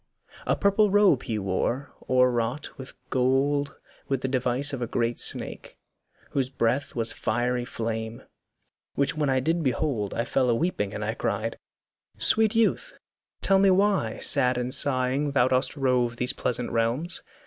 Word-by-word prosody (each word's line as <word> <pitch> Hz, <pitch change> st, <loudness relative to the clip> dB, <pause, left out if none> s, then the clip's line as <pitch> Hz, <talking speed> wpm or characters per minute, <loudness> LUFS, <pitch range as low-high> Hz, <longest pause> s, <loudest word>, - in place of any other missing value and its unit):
A -, -, +2 dB
purple 200 Hz, +1 st, +2 dB
robe 195 Hz, -, +4 dB
he 110 Hz, -, -3 dB
wore, 105 Hz, +8 st, -2 dB, 0.2 s
o'erwrought 125 Hz, +1 st, +1 dB
in 130 Hz, -, -6 dB, 0.3 s
gold 140 Hz, +2 st, +1 dB, 0.3 s
With 135 Hz, -2 st, -1 dB
the -, -, -1 dB
device 130 Hz, +2 st, 0 dB
of 130 Hz, -, -4 dB
a 120 Hz, -, -2 dB
great 115 Hz, 0 st, -1 dB
snake, -, -, -2 dB, 0.5 s
whose 135 Hz, -2 st, -1 dB
breath 130 Hz, +2 st, -1 dB
Was 115 Hz, -1 st, +1 dB
fiery 125 Hz, 0 st, -1 dB
flame: 115 Hz, -1 st, -5 dB, 0.7 s
which 140 Hz, +1 st, +1 dB
when 150 Hz, -2 st, 0 dB
I 130 Hz, 0 st, +2 dB
did 165 Hz, +6 st, 0 dB
behold 130 Hz, -7 st, -1 dB
I 115 Hz, -, -1 dB
fell 130 Hz, -2 st, +1 dB
a 120 Hz, -, +3 dB
weeping, 115 Hz, -, -1 dB
and -, -, -4 dB
I -, -, -2 dB
cried, -, -, -3 dB, 0.6 s
'Sweet 220 Hz, -1 st, +3 dB
youth, 230 Hz, -, 0 dB, 0.5 s
Tell 195 Hz, -1 st, +4 dB
me 195 Hz, 0 st, +4 dB
why, 190 Hz, -, +1 dB
sad 125 Hz, -3 st, +3 dB
and 125 Hz, +1 st, -1 dB
sighing, 140 Hz, +1 st, +2 dB
thou 125 Hz, -2 st, +3 dB
dost 130 Hz, +3 st, 0 dB
rove 125 Hz, -3 st, +1 dB
These 125 Hz, +3 st, +1 dB
pleasent 125 Hz, -2 st, -3 dB
realms? 120 Hz, +9 st, -1 dB
130 Hz, 160 wpm, -26 LUFS, 120-145 Hz, 0.7 s, robe